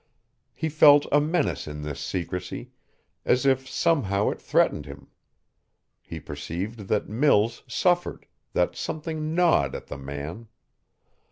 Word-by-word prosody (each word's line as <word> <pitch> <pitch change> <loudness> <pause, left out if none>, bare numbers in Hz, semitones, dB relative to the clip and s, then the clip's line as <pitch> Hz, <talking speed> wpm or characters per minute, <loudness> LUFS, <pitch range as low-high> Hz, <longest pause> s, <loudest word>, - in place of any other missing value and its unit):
He 160 - -2
felt 145 -1 +6
a 145 - +5
menace 145 - 0
in 75 0 -6
this 75 -1 -5
secrecy, 90 0 -5 0.5
as 125 +2 +2
if 130 -1 +2
somehow 105 - +1
it - - -8
threatened 75 - +1
him. 70 0 -11 0.9
He - - -8
perceived 95 +9 -6
that 105 - 0
Mills 115 -1 +2
suffered, 175 +7 0 0.3
that - - +1
something 155 0 -4
gnawed 165 - +3
at - - -7
the 70 - -8
man. 70 +10 -7
115 Hz, 125 wpm, -25 LUFS, -, 0.9 s, felt